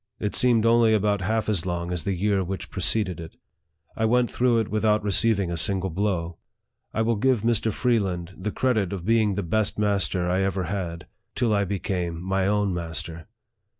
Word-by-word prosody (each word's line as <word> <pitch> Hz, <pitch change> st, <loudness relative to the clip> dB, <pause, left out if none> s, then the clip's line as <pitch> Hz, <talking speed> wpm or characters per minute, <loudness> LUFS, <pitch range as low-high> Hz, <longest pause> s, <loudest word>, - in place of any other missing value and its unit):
It 105 Hz, -, -2 dB
seemed 120 Hz, -3 st, +3 dB
only 115 Hz, -1 st, +4 dB
about 105 Hz, -1 st, +1 dB
half 110 Hz, +4 st, -1 dB
as 100 Hz, -6 st, 0 dB
long 85 Hz, -1 st, -3 dB
as 90 Hz, -3 st, -3 dB
the 100 Hz, -, 0 dB
year 100 Hz, +1 st, +1 dB
which 95 Hz, +2 st, -6 dB
preceded 95 Hz, -2 st, 0 dB
it. 80 Hz, -1 st, -10 dB, 0.6 s
I 110 Hz, -, 0 dB
went 120 Hz, +1 st, +2 dB
through 120 Hz, -1 st, +2 dB
it 110 Hz, -, -4 dB
without 105 Hz, 0 st, +1 dB
receiving 100 Hz, -2 st, +1 dB
a 85 Hz, -, -2 dB
single 95 Hz, +2 st, 0 dB
blow. 85 Hz, -3 st, -2 dB, 0.5 s
I 110 Hz, -, 0 dB
will 115 Hz, 0 st, +1 dB
give 125 Hz, 0 st, +2 dB
Mr. 115 Hz, -1 st, +1 dB
Freeland 95 Hz, -7 st, -1 dB
the 100 Hz, +3 st, -4 dB
credit 110 Hz, -8 st, 0 dB
of 90 Hz, -3 st, -5 dB
being 110 Hz, -2 st, +2 dB
the 100 Hz, -, -2 dB
best 105 Hz, +5 st, 0 dB
master 100 Hz, -3 st, 0 dB
I 90 Hz, +2 st, +1 dB
ever 95 Hz, -1 st, -1 dB
had, 85 Hz, -3 st, -4 dB, 0.3 s
till 120 Hz, -3 st, +1 dB
I 100 Hz, -1 st, +2 dB
became 90 Hz, -3 st, -3 dB
my 95 Hz, +2 st, 0 dB
own 105 Hz, -2 st, +1 dB
master. 85 Hz, -1 st, -4 dB
100 Hz, 185 wpm, -25 LUFS, 90-110 Hz, 0.6 s, only